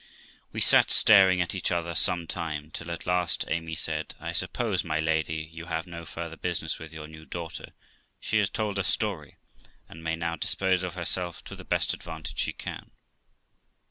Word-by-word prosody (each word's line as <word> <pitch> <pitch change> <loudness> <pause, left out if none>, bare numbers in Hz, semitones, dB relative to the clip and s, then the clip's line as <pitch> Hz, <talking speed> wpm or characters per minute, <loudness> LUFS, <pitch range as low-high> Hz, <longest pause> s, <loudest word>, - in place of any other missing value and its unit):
We - - -3
sat - - +6
staring 95 -4 +7
at 90 - -1
each 95 -2 0
other 85 -1 0
some 85 0 +2
time, 80 -3 -4
till 80 - -6
at 85 - -5
last 90 0 +1
Amy 80 0 -1
said, - - -1
'I - - -4
suppose, 110 -7 0
my 80 -2 0
lady, 80 0 0
you 85 +1 -7
have 80 0 -2
no 85 -2 -8
farther 85 -1 -6
business 85 -3 -1
with 80 0 -9
your 80 -1 -7
new 80 0 -11
daughter; 85 0 -6 0.5
she 110 - +1
has 100 -2 +3
told 105 -3 -1
her 95 - +1
story, 95 -5 -1 0.5
and 80 +1 -11
may 80 0 0
now 85 0 -2
dispose 95 +3 +1
of 90 -1 -4
herself 90 0 -1
to - - -8
the - - -10
best - - +1
advantage 80 -2 -6
she - - +1
can.' - - -7
85 Hz, 185 wpm, -28 LUFS, 80-90 Hz, 0.5 s, staring